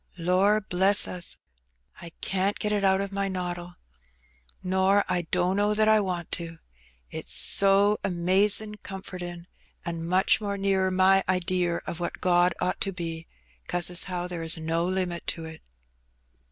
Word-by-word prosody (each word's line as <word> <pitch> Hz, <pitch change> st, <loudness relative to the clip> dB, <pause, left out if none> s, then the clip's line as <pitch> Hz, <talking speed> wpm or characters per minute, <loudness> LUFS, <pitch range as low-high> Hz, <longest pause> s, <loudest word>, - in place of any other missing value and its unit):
Lor* 185 Hz, +5 st, +2 dB
bless 190 Hz, +1 st, +2 dB
us! 175 Hz, -2 st, -1 dB, 0.6 s
I 170 Hz, -, -8 dB
can't 195 Hz, +1 st, -1 dB
get 210 Hz, -, -2 dB
it 205 Hz, -1 st, 0 dB
out 190 Hz, 0 st, +3 dB
o' 200 Hz, -, -3 dB
my 200 Hz, 0 st, -1 dB
noddle; 175 Hz, -2 st, -5 dB, 0.9 s
nor 190 Hz, +2 st, +2 dB
I 175 Hz, -2 st, -1 dB
dunno 190 Hz, +4 st, +1 dB
that 215 Hz, 0 st, +3 dB
I 220 Hz, 0 st, +5 dB
want 180 Hz, -4 st, -3 dB
to, 165 Hz, -1 st, -8 dB, 0.5 s
it's -, -, -6 dB
so 200 Hz, +1 st, +3 dB
amazin' 195 Hz, +4 st, +2 dB
comfortin', 180 Hz, -3 st, -8 dB, 0.4 s
and 165 Hz, -1 st, -4 dB
much 185 Hz, +4 st, +3 dB
more 200 Hz, -1 st, -3 dB
nearer 195 Hz, -1 st, +1 dB
my 190 Hz, +1 st, +4 dB
idear 180 Hz, -1 st, 0 dB
of 170 Hz, -, -5 dB
what 175 Hz, -, -4 dB
God 175 Hz, -1 st, +3 dB
ought 180 Hz, 0 st, -2 dB
to 195 Hz, -, 0 dB
be, 165 Hz, -2 st, -6 dB, 0.4 s
'cause 175 Hz, 0 st, 0 dB
as 180 Hz, -, +2 dB
how 180 Hz, -2 st, -4 dB
there 175 Hz, -2 st, -6 dB
is 165 Hz, +1 st, +3 dB
no 165 Hz, +1 st, -1 dB
limit 180 Hz, -2 st, -3 dB
to 165 Hz, -, -4 dB
it." 160 Hz, 0 st, -10 dB
185 Hz, 155 wpm, -26 LUFS, 175-195 Hz, 0.9 s, I